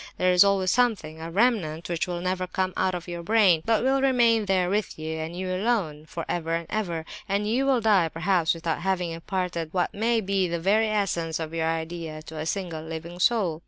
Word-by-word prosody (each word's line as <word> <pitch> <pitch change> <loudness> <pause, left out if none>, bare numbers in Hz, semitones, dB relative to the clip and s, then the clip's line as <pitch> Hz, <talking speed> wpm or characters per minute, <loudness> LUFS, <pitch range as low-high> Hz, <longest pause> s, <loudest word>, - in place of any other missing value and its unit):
There 185 0 +3
is 180 +1 +7
always 195 -2 +2
a - - +2
something, 195 -11 0
a 165 - -5
remnant, 175 -6 +1
which 170 0 -1
will 175 -1 -3
never 185 0 -1
come 185 0 -1
out 185 -1 0
from 175 - -9
your 170 0 -5
brain, 190 -3 +4
but 225 -1 +2
will 270 +1 +2
remain 235 -5 +3
there 190 -2 +2
with 205 +1 -1
you, 160 0 -4
and 160 +2 -5
you 185 0 -3
alone, 185 -7 -1
for 165 - -5
ever 165 -1 -1
and 165 0 -3
ever, 175 -7 -2 0.2
and 200 +2 0
you 255 +5 +1
will 260 -3 +3
die, 200 -7 +3
perhaps, 170 0 +1
without 165 -1 -3
having 180 -2 -1
imparted 170 -1 -3
what 180 - 0
may 225 +2 +1
be 195 -2 0
the 170 0 -2
very 210 +6 +3
essence 175 -7 -1
of 160 0 -5
your 165 -1 0
idea 160 -1 -4
to 160 0 -8
a 155 - -3
single 170 -3 -3
living 165 +2 -7
soul. 185 -7 +2
180 Hz, 220 wpm, -26 LUFS, 165-205 Hz, 0.2 s, is